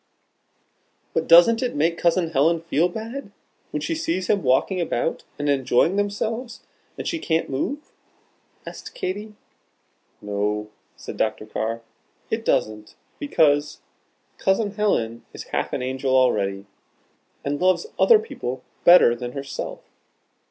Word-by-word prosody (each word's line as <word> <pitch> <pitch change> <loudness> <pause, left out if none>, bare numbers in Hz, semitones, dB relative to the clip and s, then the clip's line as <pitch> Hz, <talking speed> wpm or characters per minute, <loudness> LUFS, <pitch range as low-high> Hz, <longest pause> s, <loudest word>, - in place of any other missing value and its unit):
"But - - 0
doesn't 175 +8 +7
it 250 - -2
make 165 +3 +1
Cousin 170 -1 +2
Helen 160 +3 +2
feel 165 +1 +1
bad, 225 +4 -7 0.4
when - - -3
she 330 - -2
sees 320 - -1
them 200 0 +1
walking 145 +7 +2
about 165 -2 -1
and 145 - -2
enjoying 140 +5 +2
themselves, 220 +4 -2 0.4
and - - -5
she 335 - -1
can't 160 - -1
move?" 280 - -3 0.7
asked - - -9
Katy. 210 +3 -4 0.8
"No," 105 +1 -2 0.3
said - - -8
Dr. - - -1
Carr, 115 +1 -3 0.5
"it - - -1
doesn't, 105 0 -1 0.2
because 150 - +2 0.6
Cousin 205 +2 +1
Helen 120 - -1
is - - -7
half - - -1
an - - -2
angel 130 +1 -1
already, 100 -6 +1 0.8
and 145 +1 -2
loves 185 - +3
other 465 - +7
people 130 - -5 0.2
better 175 -9 +8
than 120 +1 -6
herself. 140 -1 -6
165 Hz, 130 wpm, -23 LUFS, 130-205 Hz, 0.8 s, better